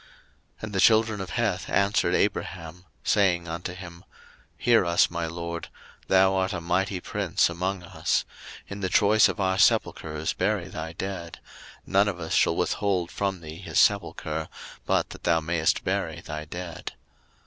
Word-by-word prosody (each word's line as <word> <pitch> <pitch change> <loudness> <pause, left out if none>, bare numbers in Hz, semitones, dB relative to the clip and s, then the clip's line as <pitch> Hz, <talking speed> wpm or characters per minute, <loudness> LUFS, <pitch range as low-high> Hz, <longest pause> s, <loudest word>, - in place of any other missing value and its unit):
01:023:005 - - -24 0.5
And 110 -1 -5
the 95 - 0
children 110 -2 +4
of 95 - -6
Heth - - -1
answered 100 +1 +2
Abraham, 90 0 -2 0.2
saying 90 -4 +2
unto 85 +2 -5
him, 85 -1 -10
01:023:006 - - -30 0.6
Hear 115 -5 +5
us, 85 0 +3
my 85 -1 -2
lord: 85 0 -5 0.4
thou 95 0 +4
art 95 +1 0
a 90 - -2
mighty 90 +3 0
prince 85 - 0
among 90 +2 -3
us: - - -1 0.4
in 100 - -7
the 95 -2 -1
choice 105 +4 +5
of - - -4
our 95 0 +1
sepulchres 80 -8 +1
bury - - -1
thy 80 +1 -6
dead; 85 -2 -6 0.5
none 100 +2 +3
of 95 -4 -3
us 80 -1 -4
shall - - +3
withhold 95 -4 0
from 95 -3 -2
thee 80 0 -9
his 95 - -5
sepulchre, 80 -6 +1 0.4
but - - +1
that - - -10
thou 85 -1 +3
mayest 80 0 0
bury - - -2
thy 75 0 -6
dead. 85 +1 -7
90 Hz, 165 wpm, -26 LUFS, 85-100 Hz, 0.6 s, Hear